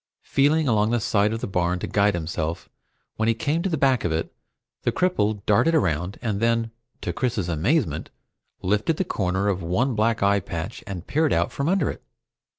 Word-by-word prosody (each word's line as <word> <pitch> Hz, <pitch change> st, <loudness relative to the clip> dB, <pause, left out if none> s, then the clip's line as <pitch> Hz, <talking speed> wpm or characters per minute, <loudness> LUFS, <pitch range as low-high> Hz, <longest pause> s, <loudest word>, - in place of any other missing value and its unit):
Feeling 150 Hz, +2 st, +2 dB
along 110 Hz, -3 st, +3 dB
the 120 Hz, 0 st, +1 dB
side 105 Hz, 0 st, +2 dB
of 115 Hz, +1 st, -3 dB
the -, -, -2 dB
barn 90 Hz, -2 st, 0 dB
to -, -, -4 dB
guide 100 Hz, -1 st, +2 dB
himself, 85 Hz, 0 st, -3 dB, 0.5 s
when 110 Hz, -, +1 dB
he 115 Hz, -, +3 dB
came 150 Hz, +8 st, 0 dB
to 195 Hz, -, -1 dB
the 160 Hz, -, 0 dB
back 135 Hz, -4 st, +2 dB
of 85 Hz, -, 0 dB
it 80 Hz, +1 st, -2 dB, 0.5 s
the -, -, +1 dB
cripple 110 Hz, -, 0 dB
darted 155 Hz, +11 st, +3 dB
around, 90 Hz, -, 0 dB
and 105 Hz, -4 st, -1 dB
then, 115 Hz, 0 st, +1 dB, 0.3 s
to -, -, -3 dB
Chris's 120 Hz, -8 st, -1 dB
amazement, 85 Hz, -, 0 dB, 0.5 s
lifted 105 Hz, -, +1 dB
the -, -, +1 dB
corner 95 Hz, -, -1 dB
of 95 Hz, -2 st, 0 dB
one 105 Hz, +11 st, 0 dB
black 110 Hz, 0 st, +1 dB
eye 100 Hz, 0 st, +4 dB
patch 85 Hz, +1 st, -6 dB
and 90 Hz, -3 st, -6 dB
peered 150 Hz, +4 st, +1 dB
out -, -, +1 dB
from 140 Hz, +3 st, -1 dB
under 190 Hz, -5 st, +2 dB
it! -, -, -11 dB
105 Hz, 195 wpm, -24 LUFS, 90-130 Hz, 0.5 s, eye